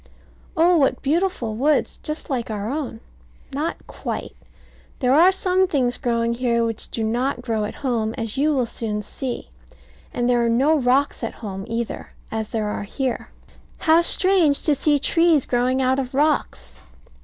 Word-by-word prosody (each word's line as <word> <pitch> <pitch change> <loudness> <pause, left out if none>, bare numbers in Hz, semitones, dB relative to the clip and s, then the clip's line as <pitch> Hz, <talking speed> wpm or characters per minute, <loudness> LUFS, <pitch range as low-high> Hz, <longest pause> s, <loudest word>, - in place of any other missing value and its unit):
Oh, 345 +2 +5
what 275 -4 +1
beautiful 290 - 0
woods, 290 +6 +1
just 305 0 -4
like 250 -6 -2
our 210 +1 -3
own. 270 -6 -4 0.5
Not 300 +4 -3
quite. - - -6 0.6
There 255 -1 +2
are 340 +6 +6
some 375 0 +1
things 250 -6 0
growing 235 -2 0
here 235 -1 +1
which 225 -1 -3
do 225 - -3
not 245 +3 -1
grow 225 -3 -1
at 210 - -6
home, 225 -3 0
as 225 -3 -3
you 295 +3 +2
will 260 -4 +1
soon 215 -2 -3
see. 245 +4 -6 0.6
And 240 0 -1
there 240 -1 +3
are 235 - +1
no 270 +7 +3
rocks 260 +1 +1
at 230 - -4
home, 195 -1 -5
either, 230 0 -4 0.2
as 220 -1 -3
there 220 -2 -2
are 210 - -3
here. 250 +4 -3 0.5
How 325 0 +4
strange, 345 -4 +4
to 300 - +3
see 290 +1 +2
trees 330 0 +3
growing 255 +2 +1
out 260 +1 +2
of 260 -1 -4
rocks! 275 - 0
255 Hz, 165 wpm, -22 LUFS, 230-300 Hz, 0.6 s, are